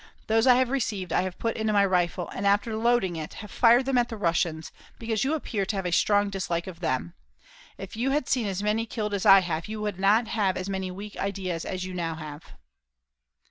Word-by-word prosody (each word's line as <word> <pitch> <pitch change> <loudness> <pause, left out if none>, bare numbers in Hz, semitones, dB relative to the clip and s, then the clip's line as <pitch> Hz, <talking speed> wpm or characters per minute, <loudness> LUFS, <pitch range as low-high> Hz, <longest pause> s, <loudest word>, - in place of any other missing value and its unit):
Those 225 +2 +2
I 250 - +8
have 255 0 +2
received 210 -9 -2
I - - +3
have 185 -1 -4
put 230 -1 -2
into 220 -1 -1
my 200 -1 +4
rifle, 180 -1 0
after 205 +3 +1
loading 225 -5 +1
it, - - -4
and 155 - -7
have 210 - -10
fired 240 +2 +5
them 265 -2 +2
at 240 - 0
the 225 - -6
Russians, 165 -4 -1 0.3
because 225 -2 -1
you 285 +4 +1
appear 225 -9 -2
to 210 - -2
have 195 -1 -3
a 180 - -1
strong 205 +3 +2
dislike 175 -3 -2
of 180 -3 -9
them. 130 - -2 0.6
If 195 +1 -8
you 245 +4 0
had 275 -1 0
seen 245 -5 +1
as 195 0 -3
many 220 +2 0
killed 210 -2 -3
as 200 +1 0
I 195 -1 +9
have 165 -2 -3
you 215 0 -5
would 205 -3 -3
not 210 +4 +3
have 195 -4 0
as 185 - -4
many 190 -1 -3
weak 200 +3 -8
ideas 190 -4 -3
as 185 0 -4
you 185 - -6
now 165 -2 -3
have." 155 -1 -9
200 Hz, 230 wpm, -26 LUFS, 180-225 Hz, 0.6 s, I